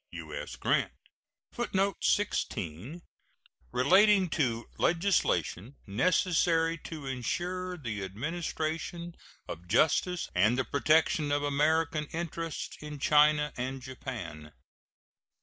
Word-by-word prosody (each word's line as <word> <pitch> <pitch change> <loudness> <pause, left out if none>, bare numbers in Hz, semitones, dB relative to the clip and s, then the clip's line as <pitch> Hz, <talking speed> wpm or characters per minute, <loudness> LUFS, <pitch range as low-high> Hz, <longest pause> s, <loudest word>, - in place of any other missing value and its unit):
U.S. - - -6
GRANT. - - +1 0.6
[Footnote 200 -4 -1
16: 130 - -1 0.7
Relating 190 +7 +5
to 120 -8 0
legislation 165 - +1
necessary 165 - +2
to 155 -2 -8
insure 180 +8 -3
the 110 - -4
administration 160 - -4 0.3
of 85 +2 -8
justice 165 - +2
and 105 +7 +3
the 130 - 0
protection 155 +1 +2
of 145 0 +1
American 150 +2 +1
interests 165 -1 -4
in 150 -1 -7
China 150 +1 +4
and 130 +2 -3
Japan. 115 - -7
150 Hz, 95 wpm, -30 LUFS, 125-170 Hz, 0.7 s, Relating